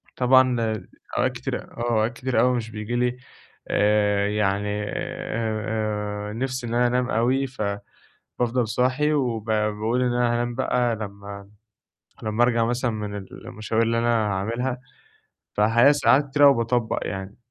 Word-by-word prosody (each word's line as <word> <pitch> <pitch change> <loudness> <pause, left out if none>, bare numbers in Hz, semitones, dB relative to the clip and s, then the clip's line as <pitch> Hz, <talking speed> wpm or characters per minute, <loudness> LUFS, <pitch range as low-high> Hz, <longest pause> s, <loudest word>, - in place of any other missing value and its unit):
طبعًا 125 -3 +3 0.4
أوقات - - +2
كتيرة - - -4
آه 120 +1 -5
أوقات 110 +2 +1
كتيرة 125 -2 0
أوي 125 0 +3
مش 110 -2 -4
بييجي 105 +3 -4
لي 125 0 0 0.5
آآ 105 -1 +2
يعني 105 0 0
آآ 105 -1 -3
آآ - - -6
نِفس 130 +2 -3
إن 115 -1 -4
أنا 120 +1 +3
أنام 125 +1 0
أوي، 130 +5 +1 0.7
فبافضل 120 -1 -2
صاحي 130 +6 +1
وب 120 -7 0
باقول 110 +2 0
إن 125 -1 +1
أنا 120 -1 +2
هانام 120 0 -1
بقى 120 -2 +1
لمّا 100 -1 -8 0.8
لمّا 110 +2 +1
أرجع 115 -2 +2
مثلًا 120 +1 0
من 105 -2 -5
المشاوير 110 +3 -3
اللي 115 0 +1
أنا 120 - 0 0.2
هاعملها، 115 +6 -2 0.8
فالحقيقة 115 +6 +5
ساعات 145 -1 +3
كتير 145 +1 +5
أوي 140 - +8
باطبّق 115 0 0
يعني. 95 +1 -6
115 Hz, 145 wpm, -24 LUFS, 105-125 Hz, 0.8 s, أوي